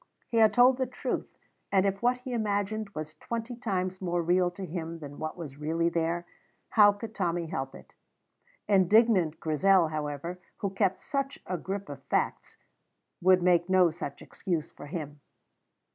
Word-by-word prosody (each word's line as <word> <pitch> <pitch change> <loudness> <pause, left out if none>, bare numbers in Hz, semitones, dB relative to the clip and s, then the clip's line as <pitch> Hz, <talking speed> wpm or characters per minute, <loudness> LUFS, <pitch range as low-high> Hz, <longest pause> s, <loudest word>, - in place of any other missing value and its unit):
He 230 - -1
had 220 -2 +6
told 250 +4 +5
the 260 -1 0
truth, 255 - -3 0.4
and 195 -1 +4
if 195 0 0
what 250 +1 +2
he 255 0 -5
imagined 215 -1 -1
was 155 0 -5
twenty 235 +6 -5
times 185 -5 -2
more 175 -2 0
real 180 +1 +3
to 190 +2 -7
him 165 -1 -5
than 145 -3 -9
what 155 +2 -4
was 145 -5 -8
really 165 +3 +1
there, 170 +1 -1 0.4
how 205 -2 +7
could 215 +1 -8
Tommy 175 -4 -1
help 135 -4 -4
it? - - -15 0.7
Indignant 195 -4 +4
Grizel, 170 +2 +3
however, 155 +3 -4 0.2
who 200 - -2
kept 195 -1 0
such 275 -1 -2
a 185 - -2
grip 195 +3 -4
of 140 -2 -8
facts, - - -1 0.6
would 185 0 +5
make 175 0 +3
no 185 -3 +5
such 150 -4 -7
excuse 170 -5 -3
for 145 - -11
him. 145 -2 -6
180 Hz, 165 wpm, -29 LUFS, 165-205 Hz, 0.7 s, how